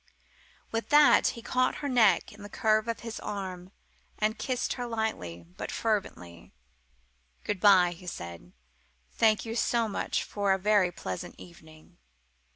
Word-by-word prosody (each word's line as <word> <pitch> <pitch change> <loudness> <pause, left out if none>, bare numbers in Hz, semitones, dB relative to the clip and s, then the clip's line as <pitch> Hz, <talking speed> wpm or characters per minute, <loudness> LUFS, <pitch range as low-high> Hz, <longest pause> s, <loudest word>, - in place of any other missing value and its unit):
With 225 0 -3
that 295 0 +6
he 230 - -9
caught 255 +1 +1
her - - 0
neck 225 -10 +3
in 210 - -14
the 205 - -9
curve 215 +1 +1
of 230 - -3
his 230 -1 -6
arm, 185 -2 -6 0.5
and 215 +1 -1
kissed 255 -2 -1
her 245 -1 -5
lightly 220 - -3
but - - -5
fervently. 90 - -3 0.9
"Good 205 - -2
bye!" 185 -3 +6
he 175 +1 -11
said; 85 - -8 0.6
"thank 220 -1 +2
you 225 0 -4
so 235 -1 +1
much 205 - -2
for 200 -2 0
a - - +1
very 200 -2 +2
pleasant 95 - -6
evening!" 160 - -16
205 Hz, 150 wpm, -28 LUFS, 175-225 Hz, 0.9 s, that